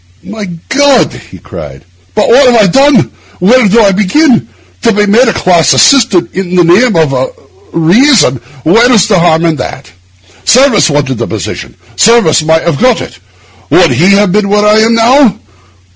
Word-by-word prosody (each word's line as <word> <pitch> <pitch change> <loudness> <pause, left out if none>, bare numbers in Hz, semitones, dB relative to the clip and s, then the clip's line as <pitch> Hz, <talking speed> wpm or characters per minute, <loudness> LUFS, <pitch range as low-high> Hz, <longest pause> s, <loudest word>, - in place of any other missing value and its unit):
'My 215 -1 -8 0.2
God!' 280 -2 +1 0.2
he - - -13
cried, 70 -4 -11 0.3
'but - - 0
what 255 +1 +3
have 235 - +2
I 210 - +3
done? 275 +9 +2
and 195 - 0 0.3
when 225 +5 +2
did 225 +4 +2
I 200 -2 +2
begin? 215 - 0 0.3
To - - +1
be 210 -1 0
made 225 +5 +2
a 230 - 0
class 175 -3 +1
assistant—in 190 -7 +1
the 180 - +3
name 195 +7 +2
of 155 -4 0 0.6
reason, 170 - +1 0.2
where's 225 +4 +2
the 200 -4 +1
harm 165 -1 +1
in 160 -2 -1
that? 125 - -8 0.5
Service 255 -7 +2
wanted 140 -5 -3
the 115 - -3
position; - - -7 0.2
Service 220 -9 +2
might 160 +1 0
have 170 -1 -3
got 250 -2 +1
it. - - -10 0.5
Would - - +2
he 190 +3 +1
have 200 -1 +1
been 205 0 -1
where 210 +1 0
I 210 +1 +3
am 225 +1 +1
now? 240 +1 +2
205 Hz, 175 wpm, -8 LUFS, 170-240 Hz, 0.6 s, what